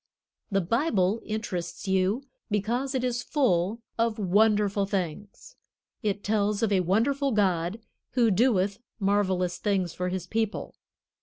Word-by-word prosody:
The 195 -2 +1
Bible 215 - +1
interests 185 -5 -4
you 190 +6 +1 0.3
because 235 +6 -1
it 255 - 0
is 245 -1 0
full 230 - +1 0.2
of 230 -1 +1
wonderful 205 0 +2
things. 195 0 -4 0.5
It 205 -3 -1
tells 210 0 +1
of 220 - +2
a 195 - +4
wonderful 255 - +1
God 190 -2 +1 0.3
who 235 -3 +4
doeth 200 -2 +2 0.2
marvelous 190 -3 +1
things 190 -5 0
for 180 +1 -2
His 180 -1 -3
people. 220 +2 -2
205 Hz, 130 wpm, -27 LUFS, 185-225 Hz, 0.5 s, a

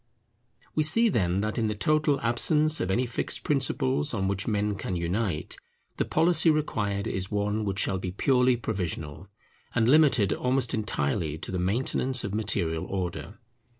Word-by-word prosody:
We 155 - +1
see, 225 +10 +5
then, 95 - 0
that 110 +3 -2
in 110 - +1
the 105 - -2
total 150 +6 +1
absence 150 +6 +2
of 90 - -2
any 120 +7 +1
fixed 115 - -3
principles 135 -1 0
on 95 -2 -1
which 100 0 -2
men 105 -1 0
can 95 -2 -4
unite, 85 0 -2 0.4
the - - 0
policy 165 -1 +3
required 105 -10 -1
is 95 0 -3
one 105 +1 -1
which 100 -1 -3
shall 95 -1 +1
be 90 - -4
purely 125 +5 +2
provisional, 90 -6 -4 0.5
and 115 -2 +2
limited 130 - +4
almost 125 -1 0
entirely 80 -6 -2
to 80 - -7
the 90 - -2
maintenance 125 +6 0
of 100 - -4
material 90 -7 -1
order. 95 +2 -5
105 Hz, 160 wpm, -27 LUFS, 95-130 Hz, 0.5 s, see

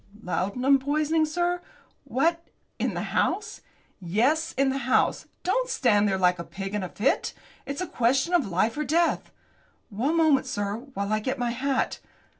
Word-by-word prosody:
"Laudanum 250 +10 +2
poisoning, 305 +3 +1
sir! 350 +3 0 0.4
What, 335 +6 0 0.3
in - - -1
the - - -2
house?" 425 +1 0 0.4
"Yes, 250 - +1
in 275 +1 +2
the 270 +1 -1
house. - - +2 0.2
Don't - - +1
stand 210 - +3
there 195 -1 +1
like 180 -1 +2
a - - -3
pig 195 +3 -6
in 210 - -1
a 185 - -4
fit. 220 +9 0 0.3
It's 280 +5 -4
a - - -1
question 265 +8 +1
of 325 -10 +3
life 200 +5 +1
or 300 - -1
death!" 330 +4 +1 0.6
"One 265 +11 0
moment, 300 -5 +4
sir, 205 -4 -2 0.2
while 200 +1 -1
I 215 - +2
get 260 +5 -2
my 245 -1 -1
hat." 265 +2 -1
265 Hz, 170 wpm, -26 LUFS, 205-315 Hz, 0.6 s, moment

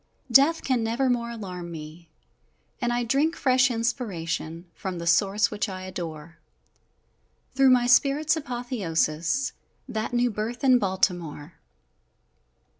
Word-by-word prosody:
Death 285 +7 +5
can 255 -4 +1
never 240 +4 +1
more 235 -1 -1
alarm 185 -7 -7
me, 160 +1 -10 0.7
And 240 -1 0
I 240 0 0
drink 280 +8 +1
fresh 255 -1 +3
inspiration 180 -9 -3
From 185 -2 -5
the 170 - -5
Source 200 +4 +3
which 210 0 -2
I 185 -1 -6
adore 165 -3 -7 1.1
Through 270 0 +5
my 250 -1 +4
Spirit's 280 +5 +4
apothéosis 240 - -1 0.4
That 220 +1 -3
new 245 0 +1
birth 220 +4 -4
in 255 -2 +5
Baltimore! 175 -5 -1
225 Hz, 120 wpm, -26 LUFS, 170-250 Hz, 1.1 s, Death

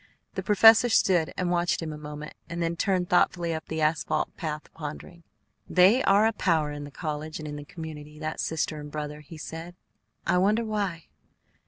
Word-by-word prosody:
The - - -3
professor 225 +3 +7
stood 185 -6 +3
and 180 -1 0
watched 175 0 +1
him 160 -2 -4
a - - -6
moment, 150 0 -8 0.2
and 170 0 -4
then 170 0 0
turned 185 0 0
thoughtfully 175 -1 +2
up 160 0 -5
the 160 0 -3
asphalt 155 0 0
path, 155 -2 -4
pondering. 155 +2 -8 0.5
"They 190 +8 +5
are 200 +2 +5
a 225 - +2
power 160 -7 +1
in 145 0 -6
the - - -9
college 155 +1 -5
and 155 - -7
in 145 - -5
the 145 0 -8
community, 150 -2 -9
that 155 +1 -4
sister 155 -1 -1
and 150 0 -8
brother," 150 0 -5
he 155 +2 -11
said. 165 +3 -7 0.5
"I 180 - +3
wonder 210 +5 +2
why." 200 -6 -2
165 Hz, 190 wpm, -27 LUFS, 150-180 Hz, 0.5 s, professor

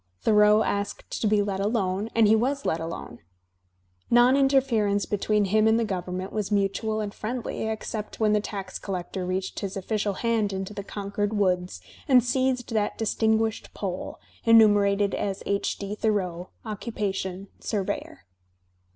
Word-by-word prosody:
Thoreau 210 0 +5
asked 200 0 -3
to 220 - +2
be 210 -1 +3
let 195 -1 -2
alone, 200 -1 0
and 225 -2 +5
he 220 - +6
was 275 +5 0
let 160 - 0
alone. 165 -7 -6 0.9
Non 240 +2 +6
interference 255 -7 +2
between 210 0 +1
liiTTi 215 +3 +3
and 225 +1 +3
the 230 - +1
government 185 -1 -4
was 215 -1 -2
mutual 210 +2 0
and 205 -1 -4
friendly, 225 0 -4
except 220 -1 -5
when 215 -1 +3
the 210 - +4
tax 195 -3 -6
collector 185 -1 -4
reached 185 +1 -2
his 195 -1 -4
official 205 +1 -1
hand 220 -1 0
into 190 +2 -4
the 200 -1 -5
Con 200 0 -6
cord 205 +1 -1
woods 180 - 0 0.3
and 255 -3 +6
seized 255 -1 0
that 210 -2 0
distinguished 220 0 0
poll, 185 -3 -4 0.2
enumerated 205 -3 +5
as 195 -1 -2
H. 200 0 -1
D. 200 0 -5
Thoreau, 190 -5 -1 0.2
occupation, 200 -3 -4
surveyor. 195 - -4
205 Hz, 150 wpm, -26 LUFS, 195-220 Hz, 0.9 s, he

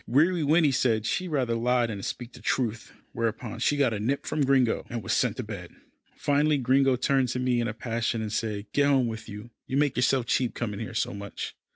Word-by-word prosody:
Weary 160 +8 +3
Winnie 155 0 +4
said 115 -4 +1
she'd 180 +10 -1
rather 135 -7 0
lie 120 +1 +2
than 105 -4 -5
speak 120 +4 -5
the - - -13
truth, 115 -3 -1 0.2
whereupon 115 0 -3
she 145 - +2
got 135 -5 +2
a 105 - -3
nip 130 +7 -1
from 155 - 0
Gringo, 130 -3 +2
and 120 -3 -4
was - - -1
sent - - +1
to - - -3
bed. - - -8 0.4
Finally 145 +1 +2
Gringo 135 +1 +3
turned 130 +1 +2
to 125 - -2
me 125 -1 +1
in 115 - -1
a 110 - -3
passion, 115 0 -2
and 110 -1 -4
said, 105 -2 -2
"Get 145 0 +3
home 135 -3 +3
with 110 -2 -5
you 105 +3 -9 0.2
you 130 - -1
make 145 -2 +2
yourself 125 0 +2
cheap 125 +1 0
coming 105 -4 -3
here 115 0 -6
so - - 0
much." 100 0 -6
125 Hz, 225 wpm, -27 LUFS, 115-135 Hz, 0.4 s, Winnie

